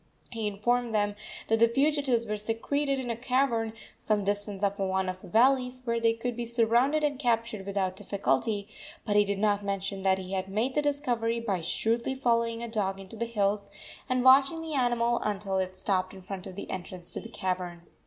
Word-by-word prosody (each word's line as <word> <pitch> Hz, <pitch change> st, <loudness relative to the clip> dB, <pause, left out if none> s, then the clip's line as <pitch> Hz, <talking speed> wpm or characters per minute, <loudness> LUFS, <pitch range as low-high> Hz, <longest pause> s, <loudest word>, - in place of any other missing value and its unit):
He 225 Hz, -2 st, -2 dB
informed 230 Hz, +3 st, 0 dB
them 205 Hz, -1 st, +2 dB, 0.3 s
that 225 Hz, 0 st, +2 dB
the 230 Hz, -, +7 dB
fugitives 270 Hz, -2 st, +1 dB
were 210 Hz, -1 st, -2 dB
secreted 270 Hz, +7 st, 0 dB
in 250 Hz, -3 st, -3 dB
a -, -, -2 dB
cavern 245 Hz, -2 st, +1 dB, 0.3 s
some 210 Hz, -2 st, 0 dB
distance 205 Hz, 0 st, -1 dB
up 200 Hz, +1 st, +1 dB
one 190 Hz, -1 st, 0 dB
of 185 Hz, 0 st, -4 dB
the -, -, -11 dB
valleys, 255 Hz, +4 st, +3 dB
where 235 Hz, -1 st, 0 dB
they 230 Hz, 0 st, +3 dB
could 235 Hz, +1 st, -3 dB
be 240 Hz, -, -3 dB
surrounded 235 Hz, +6 st, +2 dB
and 285 Hz, -3 st, 0 dB
captured 230 Hz, -6 st, 0 dB
without 190 Hz, -2 st, -1 dB
difficulty; 200 Hz, -, 0 dB, 0.4 s
but 205 Hz, -, 0 dB
he 205 Hz, -, +6 dB
did 200 Hz, -1 st, -2 dB
not 205 Hz, 0 st, +2 dB
mention 195 Hz, -1 st, -3 dB
that 190 Hz, 0 st, +3 dB
he 190 Hz, 0 st, -6 dB
had 190 Hz, 0 st, -1 dB
made 220 Hz, +7 st, 0 dB
the 295 Hz, -, +2 dB
discovery 245 Hz, -6 st, 0 dB
by 200 Hz, -6 st, -1 dB
shrewdly 230 Hz, +9 st, 0 dB
following 230 Hz, -2 st, +1 dB
a -, -, -3 dB
dog 195 Hz, -4 st, -1 dB
into 195 Hz, +3 st, -10 dB
the 235 Hz, -, -2 dB
hills, 205 Hz, -2 st, 0 dB, 0.4 s
and 255 Hz, -1 st, +1 dB
watching 275 Hz, +5 st, +6 dB
the 320 Hz, -1 st, -5 dB
animal 240 Hz, -3 st, +2 dB
until 200 Hz, -2 st, -1 dB
it 185 Hz, 0 st, -3 dB
stopped 185 Hz, -1 st, 0 dB
in 190 Hz, -, -12 dB
front 190 Hz, 0 st, -6 dB
of 185 Hz, -, -9 dB
the 200 Hz, -, -6 dB
entrance 180 Hz, -1 st, -6 dB
to -, -, -5 dB
the 230 Hz, -, -9 dB
cavern. 180 Hz, -4 st, -3 dB
225 Hz, 205 wpm, -29 LUFS, 195-240 Hz, 0.4 s, the